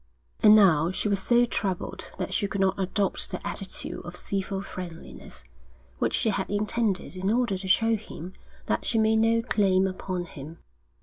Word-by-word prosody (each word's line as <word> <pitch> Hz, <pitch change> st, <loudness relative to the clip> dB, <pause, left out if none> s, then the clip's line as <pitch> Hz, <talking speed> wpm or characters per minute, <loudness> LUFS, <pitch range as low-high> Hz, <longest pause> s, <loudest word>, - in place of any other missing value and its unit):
And 210 Hz, 0 st, +8 dB
now 170 Hz, -6 st, +5 dB
she 190 Hz, +3 st, -1 dB
was 200 Hz, -1 st, +1 dB
so 240 Hz, +4 st, +3 dB
troubled 195 Hz, -6 st, -3 dB
that -, -, -3 dB
she 205 Hz, -, +1 dB
could 200 Hz, -, -4 dB
not 190 Hz, 0 st, +1 dB
adopt 195 Hz, +1 st, 0 dB
the -, -, -5 dB
attitude -, -, -4 dB
of -, -, -8 dB
civil 195 Hz, 0 st, -3 dB
friendliness 175 Hz, -4 st, -9 dB, 0.6 s
which -, -, +1 dB
she 225 Hz, -, +1 dB
had 195 Hz, -2 st, -2 dB
intended 205 Hz, -2 st, -1 dB
in 185 Hz, +1 st, -2 dB
order 235 Hz, -3 st, +1 dB
to 190 Hz, +1 st, -6 dB
show 225 Hz, +4 st, +3 dB
him 190 Hz, -4 st, -8 dB, 0.3 s
that -, -, -1 dB
she 230 Hz, -, 0 dB
made 220 Hz, 0 st, +3 dB
no 225 Hz, +1 st, +3 dB
claim 195 Hz, -5 st, +2 dB
upon 185 Hz, -1 st, -3 dB
him. 155 Hz, 0 st, -10 dB
195 Hz, 175 wpm, -26 LUFS, 185-220 Hz, 0.6 s, And